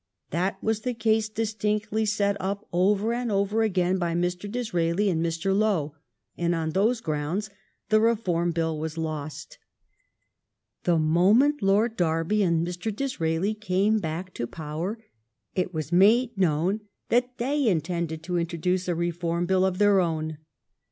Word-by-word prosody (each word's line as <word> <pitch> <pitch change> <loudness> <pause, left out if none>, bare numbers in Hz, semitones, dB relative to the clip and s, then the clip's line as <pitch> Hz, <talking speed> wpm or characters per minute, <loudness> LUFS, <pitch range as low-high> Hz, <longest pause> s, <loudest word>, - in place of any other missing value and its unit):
That 185 +4 0
was 220 0 0
the 250 0 -2
case 220 -1 +1
distinctly 215 0 -1
set 200 -1 +1
up 200 +2 -3
over 200 +5 +2
and 240 -1 -2
over 200 +2 +1
again 185 -3 +1
by 170 -1 -1
Mr. 180 +3 -2
Disraeli 195 -4 0
and 165 -1 0
Mr. 170 +3 0
Lowe, 195 -9 +1 0.4
and 170 0 0
on 160 -1 -2
those 220 +7 +1
grounds 160 +7 -2 0.4
the 215 0 +5
Reform 185 -7 +1
Bill 160 -2 -1
was 160 +1 -4
lost. 155 -2 -5 1.3
The 175 -2 +3
moment 195 - +4
Lord 210 +4 +2
Derby 165 +4 +1
and 170 -3 +2
Mr. 180 +5 -3
Disraeli 200 -6 -1
came 215 +1 +1
back 175 +2 -4
to 120 - -3
power, 160 - -4 0.6
it 185 -1 -1
was 155 -2 -4
made 225 +7 +4
known 180 +2 +1 0.3
that 250 +1 +1
they 275 +2 0
intended 170 -3 -1
to 180 -1 -1
introduce 175 +2 -1
a 175 - 0
Reform 170 0 -1
Bill 190 +1 +2
of 190 -1 +1
their 205 -1 +5
own. 160 -3 -1
185 Hz, 150 wpm, -26 LUFS, 165-215 Hz, 1.3 s, the